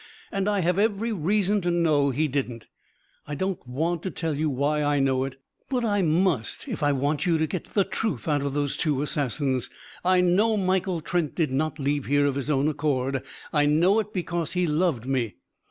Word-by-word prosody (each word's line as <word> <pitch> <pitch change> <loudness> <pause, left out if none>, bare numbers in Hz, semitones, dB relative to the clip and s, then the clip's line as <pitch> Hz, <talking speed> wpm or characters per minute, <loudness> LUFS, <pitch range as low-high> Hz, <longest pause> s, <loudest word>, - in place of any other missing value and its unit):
"And 195 0 0
I 205 -2 +1
have 180 +2 +1
every 220 +2 +1
reason 200 +3 +1
to 175 - -1
know 155 -5 +3
he 150 +4 +1
didn't. 125 -5 -3 0.6
I 145 - -4
don't 190 -4 -3
want 160 +7 -1
to 190 - -3
tell 165 -2 -2
why 150 0 0
I 145 -1 +2
know 135 -1 +2
it. 135 0 -8 0.3
But 250 -3 0
I 205 -2 +2
must, 165 - +1
if 225 -9 -4
I 145 0 +3
want 145 +4 0
you 165 -2 +3
to 160 - +1
get 165 +3 -4
the 200 - +5
truth 175 - -3
out 145 -2 +2
of 140 0 -2
those 145 -1 -1
two 145 -3 0
assassins. 140 -3 -1 0.3
I 185 +1 +4
know 205 +5 +3
Michael 185 -2 0
Trent 170 -2 -1
did 160 -6 0
not 155 +3 -1
leave 145 -1 -1
here 145 +1 +3
of 140 - +1
his 140 +1 -3
own 140 0 +2
accord. 140 -3 0 0.3
I 145 -1 +3
know 175 +8 +4
it 210 -1 -3
because 175 -4 -2
he 180 -1 +1
loved 155 -6 0
me. 125 -7 -1
155 Hz, 200 wpm, -26 LUFS, 140-185 Hz, 0.6 s, the